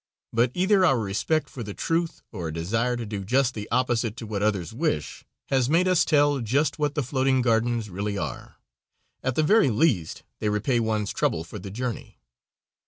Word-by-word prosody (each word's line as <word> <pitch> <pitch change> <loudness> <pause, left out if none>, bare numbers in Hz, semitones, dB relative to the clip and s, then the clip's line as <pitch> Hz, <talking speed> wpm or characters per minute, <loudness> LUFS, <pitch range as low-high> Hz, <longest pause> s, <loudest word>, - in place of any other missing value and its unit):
But 115 +2 +3
either 190 +1 +3
our 135 -8 +4
respect 110 +9 0
for 125 - -9
the 105 -3 -6
truth 165 0 -1
or 90 -7 -5
a - - -4
desire 115 +9 0
to 120 - -4
do 105 -2 -5
just 130 +5 +2
the 105 -1 -6
opposite 120 -2 0
to 115 - -6
what 105 -2 -3
others 105 -2 0
wish, 115 - -2 0.3
has 130 -2 +2
made 170 +4 +3
us 185 -2 +4
tell 145 -2 +3
just 140 +8 0
what 150 -1 0
the 150 - 0
floating 130 0 +1
gardens 115 -1 +1
really 100 +2 -3
are. 75 -9 -5 0.7
At 130 -1 -1
the 155 - +2
very 205 0 +4
least 110 - +1 0.2
they 105 - 0
repay 110 +4 +1
one's 110 -2 -1
trouble 80 - 0
for 95 +5 -9
the 95 - -8
journey. 120 +3 -5
120 Hz, 190 wpm, -25 LUFS, 105-140 Hz, 0.7 s, our